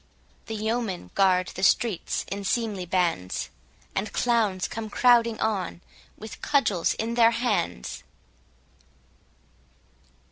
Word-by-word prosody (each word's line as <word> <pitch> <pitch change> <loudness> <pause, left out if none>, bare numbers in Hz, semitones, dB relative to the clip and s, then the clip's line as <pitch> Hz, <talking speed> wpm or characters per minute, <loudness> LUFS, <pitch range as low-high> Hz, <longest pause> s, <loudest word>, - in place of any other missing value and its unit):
The 225 - -4
yeomen 215 - -2
guard 185 -2 +3
the 190 - -7
streets 200 0 +1
in 200 +1 -5
seemly 205 -3 -1
bands; 170 - -1 0.4
And 200 +2 -2
clowns 220 -6 +1
come 220 -1 -6
crowding 235 -1 +4
on, 195 -5 -2 0.4
with 220 0 -10
cudgels 215 - +1
in 225 +1 -2
their 235 -1 +6
hands. 230 - -2
210 Hz, 105 wpm, -26 LUFS, 185-230 Hz, 0.4 s, their